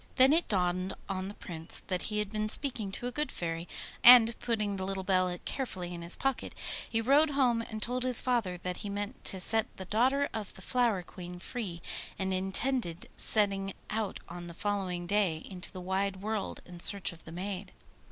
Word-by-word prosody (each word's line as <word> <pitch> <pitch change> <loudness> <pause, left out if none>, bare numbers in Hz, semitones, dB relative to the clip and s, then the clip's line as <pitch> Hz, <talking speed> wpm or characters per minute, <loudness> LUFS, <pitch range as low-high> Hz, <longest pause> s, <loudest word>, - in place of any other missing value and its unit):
Then 265 +2 +7
it 335 +2 +2
dawned 185 -1 0
on 190 -1 -3
the 205 - -7
Prince 165 -2 -7
that 185 -2 -1
he 210 - -2
had 210 -1 -1
been 215 0 -1
speaking 225 -6 -1
to 240 - -4
a 245 - -1
good 300 +4 -1
fairy, 165 0 -3 0.4
and 235 -2 +10
putting 210 -4 -1
the 190 - -3
little 190 0 -2
bell 185 -1 +2
carefully 185 -10 -3
in 170 - -6
his 170 +1 -2
pocket, 270 -2 -2 0.3
he 225 - +1
rode 285 +6 +5
home 255 -5 +2
and 220 -2 -5
told 250 +1 -1
his 255 -2 +8
father 230 -8 0
that 180 0 -4
he 205 - -4
meant 205 +4 -4
to 190 - +1
set 220 +4 +3
the 190 - -6
daughter 260 +8 +2
of 215 -2 -5
the - - -10
Flower 235 -7 +1
Queen 180 0 -9
free, 180 -3 -5 0.3
and 190 0 -1
intended 190 0 -1
setting 195 -2 +1 0.2
out 215 -2 -2
on 175 0 -8
the 170 - -9
following 190 -4 -2
day 180 -4 +1
into 185 -2 -6
the 185 - -7
wide 190 +1 -1
world 215 -1 -3
in 175 -1 -11
search 195 0 +5
of 165 - -15
the 160 - -9
maid. 190 +3 -5
200 Hz, 200 wpm, -31 LUFS, 180-230 Hz, 0.4 s, and